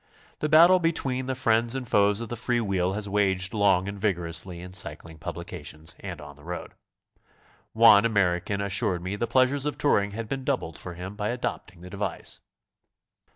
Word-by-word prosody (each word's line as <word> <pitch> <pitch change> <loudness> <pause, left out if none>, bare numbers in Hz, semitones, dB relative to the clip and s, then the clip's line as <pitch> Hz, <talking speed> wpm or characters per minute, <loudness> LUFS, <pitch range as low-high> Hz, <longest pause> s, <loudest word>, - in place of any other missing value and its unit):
The 150 - -1
battle 170 +4 +7
between 135 -6 -1
the 130 - -1
friends 115 -1 +2
and 130 -2 -4
foes 105 +1 +2
of 115 - -6
the 120 - -4
free 120 +1 -1
wheel 95 -4 0
has 105 0 -3
waged 95 -1 +1
long 100 -3 +2
a»nd 100 0 -6
vigor 95 -5 0
ously 85 +1 -2
in 90 +1 -10
cycling 80 -3 -2
publications 80 +1 -3
and - - -7
on 75 -1 -11
the 75 - -18
road. 90 +2 -7 1.0
One 110 -2 +7
Ameri 100 -6 +1
can 100 -1 -3
assured 100 -2 -1
me 95 +2 -3
the 115 +3 -2
pleasures 130 +4 +2
of 150 - -3
touring 105 -8 +2
had 115 +1 -5
been 135 +3 -4
doubled 130 - -2
for 90 -1 -8
him 90 +3 -7
by 105 0 -2
adopting 120 -8 -5
the 90 - -9
device. 100 -3 -4
100 Hz, 190 wpm, -26 LUFS, 90-120 Hz, 1.0 s, battle